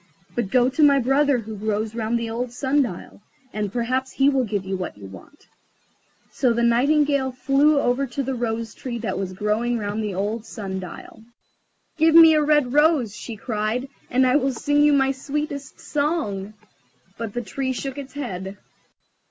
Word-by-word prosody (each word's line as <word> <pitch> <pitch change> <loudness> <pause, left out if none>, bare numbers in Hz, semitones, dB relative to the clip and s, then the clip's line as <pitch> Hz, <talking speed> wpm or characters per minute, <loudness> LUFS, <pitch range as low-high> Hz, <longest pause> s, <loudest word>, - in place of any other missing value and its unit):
But 235 -5 -2
go 250 +1 +4
to 265 +5 -1
my 285 -2 +6
brother 275 +2 +2
who 220 -2 -6
grows 215 +1 -2
round 230 0 -1
the 230 -1 -3
old 235 +2 -3
sun 270 +3 +1
dial, 205 -5 -5 0.3
and 210 -2 -2
perhaps 255 +3 -1
he 275 +1 +4
will 270 -2 +1
give 205 -3 -3
you 190 0 -2
what 185 - -5
you 100 - -11
want." 95 - -14 0.9
So 250 -3 +1
the 235 +1 0
Nightingale 275 +3 +2
flew 280 +3 +3
over 260 +2 +1
to 275 +3 -3
the 265 +1 -2
Rose 230 -2 -3
tree 245 -3 -6
that 215 -5 -3
was 190 -1 -4
growing 215 +5 0
round 210 0 -3
the 205 -3 -3
old 210 +4 -2
sun 195 -5 -5
dial. 185 +4 -10 0.8
"Give 320 0 +4
me 325 -1 +9
a 305 - +3
red 295 -4 +2
rose," 295 -8 +3
she 230 0 -7
cried, 220 +4 -2 0.2
"and 260 +1 +3
I 255 +2 +4
will 270 -2 0
sing 290 +4 +1
you 295 0 +5
my 270 -1 +3
sweetest 280 0 -5
song." 285 - -2 0.6
But 230 -2 -5
the 240 - -2
Tree 260 +6 -3
shook 270 +2 -4
its 275 -1 -9
head. 195 -8 -5
245 Hz, 185 wpm, -23 LUFS, 215-275 Hz, 0.9 s, me